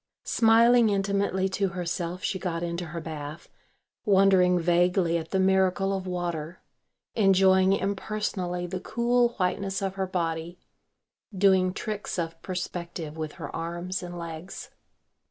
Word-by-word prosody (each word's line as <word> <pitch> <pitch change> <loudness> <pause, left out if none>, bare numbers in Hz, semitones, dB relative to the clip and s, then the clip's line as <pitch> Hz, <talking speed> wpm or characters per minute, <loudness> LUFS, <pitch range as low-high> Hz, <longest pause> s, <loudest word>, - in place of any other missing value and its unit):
Smiling 230 +1 +5
intimately 195 -1 0
to 195 +1 0
herself 175 0 -4
she 190 - -1
got 170 -2 -3
into 170 +1 -3
her 170 - -5
bath, 155 -1 -7 0.5
wondering 190 -2 +4
vaguely 175 0 +2
at 165 -1 -3
the 190 - 0
miracle 190 +1 +2
of 190 -1 -5
water, 175 -2 -4 0.5
enjoying 190 -2 +4
impersonally 195 -3 -2
the 185 +1 -4
cool 240 +3 +1
whiteness 195 +1 -1
of 195 -1 -2
her 190 -1 -2
body, 170 -1 -3 0.8
doing 190 -1 +4
tricks 210 +1 -4
of 165 -1 -4
perspective 175 -3 -5
with 155 -1 -5
her - - -7
arms 175 +3 -4
and 175 -1 -7
legs. 170 +2 -7
185 Hz, 130 wpm, -27 LUFS, 170-195 Hz, 0.8 s, Smiling